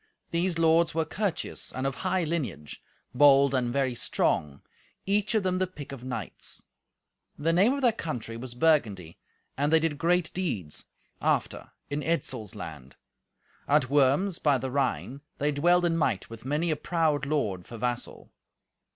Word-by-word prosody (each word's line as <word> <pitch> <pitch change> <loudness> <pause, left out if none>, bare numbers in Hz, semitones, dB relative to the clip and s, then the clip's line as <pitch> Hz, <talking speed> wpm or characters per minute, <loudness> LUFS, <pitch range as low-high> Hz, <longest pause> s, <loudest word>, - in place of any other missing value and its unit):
These 170 +1 0
lords 165 0 +3
were 160 -1 +1
courteous 195 +2 -3
and 130 +1 -4
of 135 - 0
high 185 +6 0
lineage, 120 - -4 0.3
bold 140 0 +6
and 125 -2 +1
very 135 -1 +1
strong, 75 -10 -1 0.4
each 210 +3 +1
of 215 - +2
them 185 0 0
the 185 - +1
pick 150 -7 -10
of 135 -3 -8
knights. 130 -1 -6 0.7
The 165 +3 +1
name 200 +9 +4
of 280 -1 -3
their 240 - +6
country 125 - -5
was 120 +1 -8
Burgundy, 110 - +1 0.4
and 145 +2 +2
they 160 - +6
did 155 -2 -1
great 175 0 +1
deeds, 115 - -3 0.4
after, - - 0 0.2
in 145 +1 -1
Etzel's 130 - -2
land. 75 -9 -8 0.7
At 140 -2 +3
Worms, 145 +7 +3
by 145 -3 +3
the 130 +1 -4
Rhine, 135 0 -1 0.2
they 145 +1 +1
dwelled 175 +5 +3
in 165 -1 +2
might 115 - 0
with 115 +1 -10
many 150 +5 0
a - - +1
proud 155 -3 0
lord 105 -12 -1
for 115 - -8
vassal. 120 +1 -4
145 Hz, 160 wpm, -28 LUFS, 125-170 Hz, 0.7 s, bold